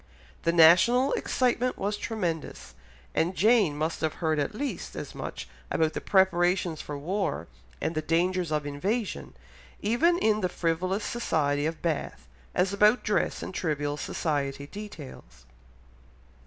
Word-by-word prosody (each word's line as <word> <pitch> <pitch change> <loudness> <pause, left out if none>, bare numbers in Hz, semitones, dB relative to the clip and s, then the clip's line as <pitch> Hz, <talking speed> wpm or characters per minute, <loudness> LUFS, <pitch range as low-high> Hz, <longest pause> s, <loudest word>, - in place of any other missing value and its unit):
The 165 - +4
national 180 - +6
excitement 250 0 0
was 205 +1 -1
tremendous, 180 -8 -4 0.4
and 175 +3 0
Jane 205 -8 +4
must 160 +2 -2
have 160 -1 -1
heard 160 -3 0
at 145 +9 -2
least 280 +3 -4
as - - -6
much - - -6 0.2
about 160 -1 +1
the - - -4
preparations 180 -3 +2
for 145 - -6
war, 170 - -2 0.3
and 160 - -1
the 155 - -1
dangers 175 +2 0
of 150 -1 0
invasion, 195 +10 -3 0.4
even 300 +12 +2
in 215 -9 +2
the 180 - 0
frivolous 180 +4 -1
society 150 -10 0
of 160 -1 -5
Bath, 160 - -3 0.3
as 190 +2 +2
about 210 +4 +4
dress 210 - 0
and - - -6
trivial 145 -5 -1
society 140 -2 -2
details. 140 - -10
175 Hz, 140 wpm, -27 LUFS, 155-210 Hz, 0.4 s, national